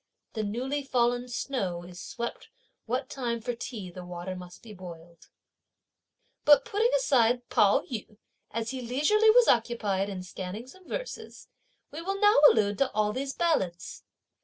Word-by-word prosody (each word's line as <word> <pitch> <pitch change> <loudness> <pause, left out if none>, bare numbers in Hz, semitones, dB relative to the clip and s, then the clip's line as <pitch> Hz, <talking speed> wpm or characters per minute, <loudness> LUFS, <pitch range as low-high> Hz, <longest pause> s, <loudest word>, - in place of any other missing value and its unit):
The 220 - -2
newly 250 +7 -2
fallen 245 -2 +1
snow 200 -8 -3
is 175 0 -10
swept 235 0 -6 0.4
what 250 +3 -1
time 240 -3 -3
for 245 +2 -3
tea 225 -6 -7
the 180 +1 -9
water 180 +1 -6
must 180 -1 -11
be 220 -2 -10
boiled. 170 -3 -12 1.2
But 295 -1 +6
putting 445 +4 +1
aside 245 - +2
Pao 205 -1 +4
yü, 215 -4 -7 0.3
as 230 +1 -3
he 260 -1 -5
leisurely 300 - +3
was 480 +2 +6
occupied 215 -5 +1
in 185 -2 -5
scanning 185 +4 -6
some 365 +8 -16
verses, - - -7 0.4
we 310 - -6
will 390 +3 -3
now 415 -7 +5
allude 205 -2 +1
to 275 - +2
all 210 0 +1
these 270 +2 -3
ballads. 190 - -1
235 Hz, 155 wpm, -28 LUFS, 195-275 Hz, 1.2 s, But